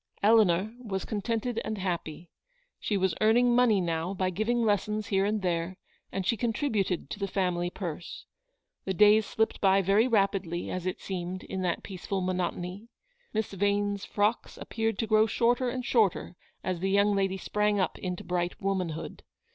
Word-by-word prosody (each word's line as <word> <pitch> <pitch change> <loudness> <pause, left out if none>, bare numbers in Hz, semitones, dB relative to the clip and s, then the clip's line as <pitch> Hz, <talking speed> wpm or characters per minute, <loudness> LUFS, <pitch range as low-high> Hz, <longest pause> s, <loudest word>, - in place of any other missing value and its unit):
Eleanor 210 -2 +4
was 190 -4 -3
contented 225 +2 -2
and 220 - -3
happy. 175 -3 -4 0.5
She 205 - -1
was 190 -2 +1
earning 240 +3 +4
money 240 -5 +4
now 170 +1 -2
by 185 0 0
giving 230 +5 0
lessons 210 0 0
here 195 -2 +2
and 210 -1 -1
there, 175 +1 -1 0.3
and 195 -1 -3
she 230 - +2
contributed 220 - -1
to - - -5
the 200 - -1
family 180 -2 0
purse. 175 -3 -6 0.6
The 190 - -2
days 210 +2 +6
slipped 220 0 -1
by 195 0 +4
very 200 +6 +4
rapidly, 195 -6 0
as 185 0 -3
it 185 - -3
seemed, 185 0 -4
in 190 - -4
that 175 -2 -1
peaceful 195 0 -4
monotony. 180 +2 -3 0.4
Miss 220 -1 -2
Vane's 205 +1 0
frocks 210 +3 -1
appeared 225 -2 -2
to 225 - -1
grow 215 0 +4
shorter 245 +3 +2
and 250 0 -4
shorter 210 -6 +1 0.3
as 185 -2 -2
the 190 +2 -1
young 200 +1 +3
lady 195 -1 0
sprang 210 +2 0
up 185 - -1
into 180 -1 -4
bright 175 +1 -2
womanhood. 185 -6 -3
195 Hz, 165 wpm, -28 LUFS, 185-215 Hz, 0.6 s, days